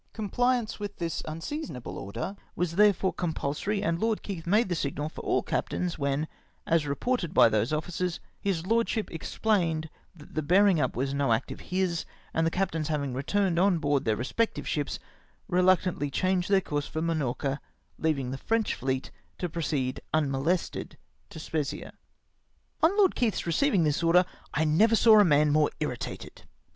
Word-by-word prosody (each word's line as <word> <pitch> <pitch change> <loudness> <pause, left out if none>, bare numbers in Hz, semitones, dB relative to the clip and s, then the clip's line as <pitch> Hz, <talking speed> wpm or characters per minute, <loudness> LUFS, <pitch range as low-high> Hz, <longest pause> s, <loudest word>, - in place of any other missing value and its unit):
Comphance 240 +2 0
with 205 -1 -5
this 165 -2 -2
unseasonable 160 - -5
order 115 - -5 0.2
was 170 -1 -1
therefore 200 -2 +4
compulsory, 175 +5 -2
and 165 0 0
Lord 225 +1 0
Keith 175 -5 -6
made 210 +5 +3
the 180 - -1
signal 150 -1 -2
for - - -9
all - - +1
captains, 180 -3 -2
when, 140 +2 0 0.4
as 165 -3 +2
reported 175 - -1
by - - +7
those 110 +3 +1
officers, 175 +3 -2 0.2
his 180 -4 -1
lord 230 +3 +2
ship 220 -2 -2
explained 165 -3 0 0.2
that 150 -3 -15
the 155 - 0
bearmg 180 +2 +4
up 130 - 0
was 135 +2 -1
no 140 -3 +1
act 110 - 0
of - - -7
liis, 180 -3 -1 0.3
and 165 0 +2
the - - +3
captains 165 -4 -1
having 145 -4 -1
returned 170 +6 0
on 190 -1 +4
board 145 -3 +1
theu" 110 -2 +2
re 120 - -3
spective 230 - -1
ships, 145 -2 -2 0.5
reluctantly 180 -4 +2
changed 185 +5 0
the 195 -1 +4
course 145 -4 -3
for 160 0 -3
Minorca, 145 -3 -1 0.4
leavmg 140 -6 0
the 135 - -5
French 225 -1 0
fleet 130 0 -2 0.3
to 180 - -2
proceed 150 -6 -2
mnno 140 -4 0
lested 175 +3 -1 0.3
to - - -11
Spezzia. 155 -2 -3 0.9
On 355 +6 +4
Lord 390 -3 +5
Keith 230 -4 0
receiving 185 - +2
this 150 0 +1
order, 175 +2 +5 0.3
I 160 - +1
never 205 +9 +4
saw 220 -1 +7
a - - +8
man 150 -4 +4
more 150 0 +4
irritated. 125 -6 -5
165 Hz, 170 wpm, -28 LUFS, 145-195 Hz, 0.9 s, a